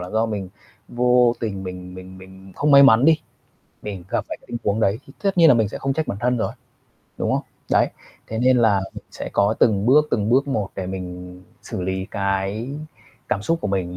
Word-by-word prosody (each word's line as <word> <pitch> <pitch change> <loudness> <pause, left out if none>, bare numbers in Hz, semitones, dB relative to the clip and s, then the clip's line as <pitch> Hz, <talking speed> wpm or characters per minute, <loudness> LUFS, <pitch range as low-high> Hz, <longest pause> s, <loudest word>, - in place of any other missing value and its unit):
là 90 0 -7
do 110 +1 +1
mình 100 -4 -4 0.4
vô 125 0 +3
tình 100 -4 -3
mình 90 0 -8
mình 95 0 -11
mình 95 +1 -14
không 150 - +1
may 140 0 +9
mắn 120 -2 +6
đi, 160 0 +5 0.6
mình 100 -4 -6
gặp - - -1
phải - - -4
cái - - -24
tình 120 - -4
huống 105 +2 0
đấy, 100 +1 +2
thì 135 - -14
tất 195 -2 0
nhiên 165 -1 +8
là 140 - +7
mình 110 -3 +2
sẽ - - -7
không 135 - -1
trách 155 +3 -2
bản 100 - -4
thân 125 +1 +1
rồi, 115 - -2 0.7
đúng - - 0
không? - - 0 0.3
Đấy, - - +3 0.4
thế 110 - -4
nên 130 +2 +4
là 110 -4 +3
mình - - -9
sẽ - - -6
có 100 +2 +2
từng 105 -2 +3
bước 150 +4 +5
từng 105 0 0
bước 135 +4 +3
một 105 -8 -1
để 95 - -3
mình 90 -1 -7 0.2
xử - - -5
lý 95 +1 -3
cái 100 +4 -2 0.6
cảm 100 - -1
xúc 165 +9 0
của - - -2
mình 90 -2 -2
105 Hz, 230 wpm, -22 LUFS, 95-125 Hz, 0.7 s, may